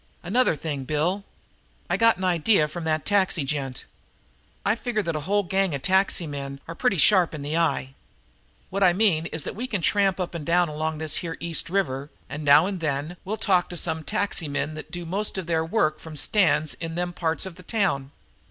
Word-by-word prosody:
"Another 210 +2 +2
thing, 145 -3 -4
Bill. 155 +8 0 0.6
I - - +1
got 230 -3 +4
an 190 - -6
idea 175 -1 +3
from 160 +2 -6
that 155 -1 0
taxi 190 -7 +2
gent. 135 -3 -3 0.8
I 205 - +4
figure 230 -2 -2
that 165 - -2
whole 195 +7 0
gang 190 -3 0
of 135 - -6
taxi 190 -2 +3
men 140 -2 -6
are 165 - -5
pretty 210 +1 +1
sharp 180 -1 +4
in 145 - -6
the 150 +2 -2
eye. 160 -5 0 0.8
What 195 +2 -2
I 180 -2 +6
mean 175 -5 +2
is 160 -3 -3
that - - -5
we 245 +5 -4
can 210 -6 -1
tramp 195 +2 +2
up 180 -1 -3
and 170 -3 -5
down 175 +2 +2
along 155 +1 -2
this 155 -1 -1
here 165 -2 -4
East 170 -1 -2
River, 145 -7 -1 0.2
and 150 +2 -5
now 145 +3 +7
and 195 -1 -3
then 150 +1 -2
we'll 215 +4 -3
talk 185 -5 +2
to 175 - -6
some 160 -1 -1
taxi 185 -1 0
men 145 +2 -2
that 155 - -8
do 175 -1 -6
most 195 +5 -2
of 190 - -3
their 165 -1 +1
work 160 -3 +1
from 160 -1 -10
stands 155 -2 +2
in 165 -1 -6
them 175 0 -2
parts 165 +1 -1
of 190 - -7
the 180 - -13
town. 180 - 0
170 Hz, 210 wpm, -25 LUFS, 155-190 Hz, 0.8 s, now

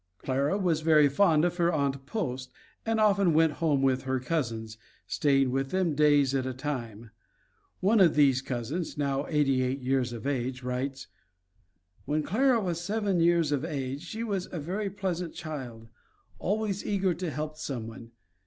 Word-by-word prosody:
Clara 140 - 0
was 175 -6 +1
very 155 -2 +5
fond 155 +2 +3
of 175 0 -1
her 170 -1 +3
Aunt 140 -3 -1
Post 130 - -3 0.4
and 225 0 +1
often 200 -6 +3
went 160 0 +4
home 145 -5 +2
with 130 -1 +2
her 130 0 -1
cousins, 115 -6 -3 0.3
staying 135 -3 +2
with 135 +1 -1
them 185 -2 +1
days 145 -2 +4
at 135 -1 +1
a 130 - -4
time. 120 -6 -5 0.7
One 210 +4 +4
of 175 -5 +5
these 135 -3 +4
cousins, 135 +7 -4
now 140 -1 -1
eighty 140 -4 +2
eight 130 +2 -1
years 130 -1 +1
of 120 +1 -7
age, 130 -2 -2
writes: 130 +2 -3 1.0
"When 150 +2 0
Clara 245 - +2
was 175 -5 -2
seven 200 -1 0
years 170 -2 +3
of 145 -1 0
age 140 -3 -3
she 215 +6 -5
was 200 -5 -3
a 175 - -4
very 195 +7 -3
pleasant 180 -4 -3
child, 125 -8 -7 0.5
always 205 0 -1
eager 195 -3 +1
to 175 +1 -4
help 155 +1 -4
someone. 115 -6 -6
150 Hz, 165 wpm, -28 LUFS, 130-175 Hz, 1.0 s, very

